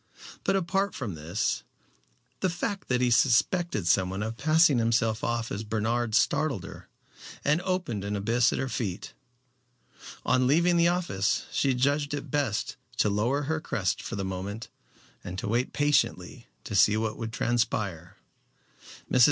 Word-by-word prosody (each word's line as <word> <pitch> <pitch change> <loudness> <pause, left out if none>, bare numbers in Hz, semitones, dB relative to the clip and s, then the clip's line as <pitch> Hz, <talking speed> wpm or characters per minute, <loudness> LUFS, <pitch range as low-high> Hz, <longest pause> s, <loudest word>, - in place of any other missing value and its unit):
But, 195 - +1
apart 195 +1 0
from 115 -8 -4
this, 80 +6 -2 0.8
the 185 - +1
fact 190 +3 -3
that 125 -1 +1
he 125 -1 +2
suspected 120 - +2
someone 95 +3 +1
of 110 +1 -4
passing 155 -1 +4
himself 115 -1 +1
off 120 -1 -1
as 105 - -3
Bernard 110 +1 -1
startled 140 - +1
her, 95 0 -10 0.6
and 150 +4 +3
opened 180 - -2
an 100 +1 -2
abyss 115 +4 +2
at - - -2
her 135 - -1
feet. 105 -7 -4 1.1
On 130 0 +3
leaving 170 +5 +3
the 170 0 +4
office 170 - 0
she 135 -2 +1
judged 145 +3 +1
it 145 -1 -7
best 130 -7 -1 0.2
to 105 - +2
lower 120 +8 0
her 155 +2 -2
crest 95 - -1
for - - -5
the 100 -1 -3
moment 95 +4 -5 0.5
and 90 - -6
to 95 - -4
wait 120 +5 0
patiently 145 -1 0 0.2
to - - -7
see 105 +2 +5
what 110 -1 -1
would 115 -1 -4
transpire. 105 -7 -1 0.9
Mrs. 125 - +3
120 Hz, 155 wpm, -27 LUFS, 105-145 Hz, 1.1 s, see